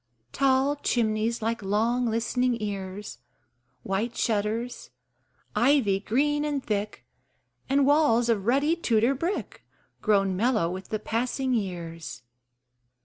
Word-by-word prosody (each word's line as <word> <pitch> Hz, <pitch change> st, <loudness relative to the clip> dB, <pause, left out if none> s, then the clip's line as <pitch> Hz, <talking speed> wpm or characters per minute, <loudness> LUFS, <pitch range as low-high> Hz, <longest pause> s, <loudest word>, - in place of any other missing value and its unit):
Tall 275 Hz, +1 st, +2 dB
chimneys, 225 Hz, -3 st, 0 dB
like 230 Hz, +1 st, -1 dB
long 225 Hz, +5 st, +1 dB
listening 235 Hz, +2 st, 0 dB
ears, 195 Hz, -, -5 dB, 0.6 s
White 210 Hz, +5 st, -2 dB
shutters, 225 Hz, +3 st, -1 dB, 0.7 s
ivy 230 Hz, -4 st, +3 dB
green 295 Hz, +8 st, +1 dB
and 290 Hz, -3 st, -2 dB
thick, 210 Hz, -, -3 dB, 0.6 s
And 275 Hz, +1 st, +3 dB
walls 285 Hz, -5 st, +4 dB
of 215 Hz, -3 st, 0 dB
ruddy 280 Hz, +6 st, +3 dB
Tudor 235 Hz, -6 st, +2 dB
brick 335 Hz, +9 st, -4 dB, 0.4 s
Grown 195 Hz, -3 st, +2 dB
mellow 215 Hz, -5 st, +1 dB
with 185 Hz, 0 st, -7 dB
the 215 Hz, -, -1 dB
passing 250 Hz, +4 st, -1 dB
years. 170 Hz, -, -4 dB
230 Hz, 110 wpm, -26 LUFS, 205-260 Hz, 0.7 s, walls